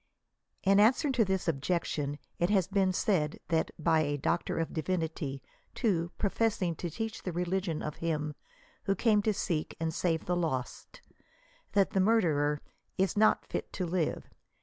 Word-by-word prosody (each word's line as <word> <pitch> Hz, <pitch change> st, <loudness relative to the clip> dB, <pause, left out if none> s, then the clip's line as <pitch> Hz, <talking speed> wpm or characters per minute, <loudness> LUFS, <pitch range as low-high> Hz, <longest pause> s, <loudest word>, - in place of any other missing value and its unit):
In 195 Hz, +1 st, +5 dB
answer 255 Hz, +7 st, +4 dB
to 250 Hz, -3 st, +3 dB
this 190 Hz, -2 st, -1 dB
objection 145 Hz, -2 st, -1 dB, 0.2 s
it 175 Hz, +1 st, +2 dB
has 195 Hz, -4 st, +3 dB
|)een 195 Hz, -2 st, +2 dB
said, 175 Hz, -5 st, +1 dB
and 160 Hz, -1 st, +1 dB
by 160 Hz, 0 st, +3 dB
a 145 Hz, -2 st, 0 dB
Doctor 170 Hz, +5 st, -1 dB
of 165 Hz, -, -2 dB
Divinity," 160 Hz, -5 st, -2 dB, 0.3 s
too, 175 Hz, -8 st, 0 dB
professing 200 Hz, -4 st, +1 dB
to 175 Hz, -, -3 dB
teach 225 Hz, +6 st, -4 dB
the 180 Hz, -, -3 dB
religion 175 Hz, -1 st, -1 dB
of 150 Hz, -, -4 dB
him 155 Hz, -2 st, -1 dB, 0.5 s
who 195 Hz, -, +2 dB
came 210 Hz, +1 st, +3 dB
to 215 Hz, -, +2 dB
seek 170 Hz, -6 st, -2 dB
and 160 Hz, 0 st, -1 dB
save 165 Hz, -1 st, 0 dB
the 180 Hz, -, 0 dB
lost, 155 Hz, -8 st, -3 dB, 0.7 s
that 200 Hz, -1 st, +3 dB
the 195 Hz, -, +1 dB
murderer 160 Hz, -9 st, +3 dB, 0.2 s
*' -, -, -49 dB
is 190 Hz, -2 st, +1 dB
not 215 Hz, +1 st, +4 dB
fit -, -, -4 dB
to 185 Hz, -, -2 dB
live." 170 Hz, -2 st, -1 dB
175 Hz, 165 wpm, -31 LUFS, 160-195 Hz, 0.7 s, In